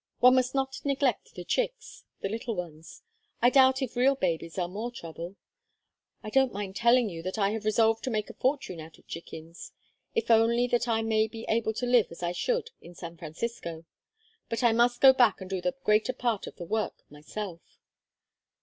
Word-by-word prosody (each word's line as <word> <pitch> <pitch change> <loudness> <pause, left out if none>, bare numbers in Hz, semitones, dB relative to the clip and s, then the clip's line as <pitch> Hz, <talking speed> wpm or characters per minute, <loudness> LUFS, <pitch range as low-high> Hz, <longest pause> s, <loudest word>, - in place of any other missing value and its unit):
One 250 +1 +7
must 255 0 +2
not 265 0 -2
neglect 275 -4 0
the 180 - -6
chicks - - -3 0.2
the - - -1
little 225 +2 -3
ones. 165 -3 -8 0.4
I 245 +1 +5
doubt 265 0 +5
if 255 - -5
real 260 +3 +4
babies 165 -7 -2
are 180 -2 0
more 210 +6 -4
trouble. 170 -5 -8 0.9
I 215 - -6
don't 265 0 +3
mind 195 -1 -5
telling 235 +1 +4
you 170 -5 -6
that 185 +5 -4
I 200 -1 +2
have 220 0 -4
resolved 220 +1 +3
to - - -1
make 215 -3 -1
a - - -9
fortune 260 - -1
out 160 +1 -11
of - - -24
chickens, 165 0 -9 0.4
if 455 - +1
only 230 +2 +4
that 240 0 +1
I 225 -1 +1
may 220 -1 +2
be 225 +1 -8
able 220 0 +1
to 250 - -2
live 245 -3 +4
as 170 - -10
I 175 - 0
should 475 - -1
in 175 +1 -13
San 170 -1 -8
Francisco. 165 0 -6 0.6
But 230 +2 -2
I 235 - +6
must 240 +1 +2
go 265 -1 +9
back 245 -5 +4
and 190 - -8
do 190 -1 -3
the 270 +5 -1
greater 215 +4 +3
part 235 -4 -1
of - - -9
the 175 - -7
work 215 +5 -2
myself." 170 +4 -7
225 Hz, 200 wpm, -28 LUFS, 180-245 Hz, 0.9 s, go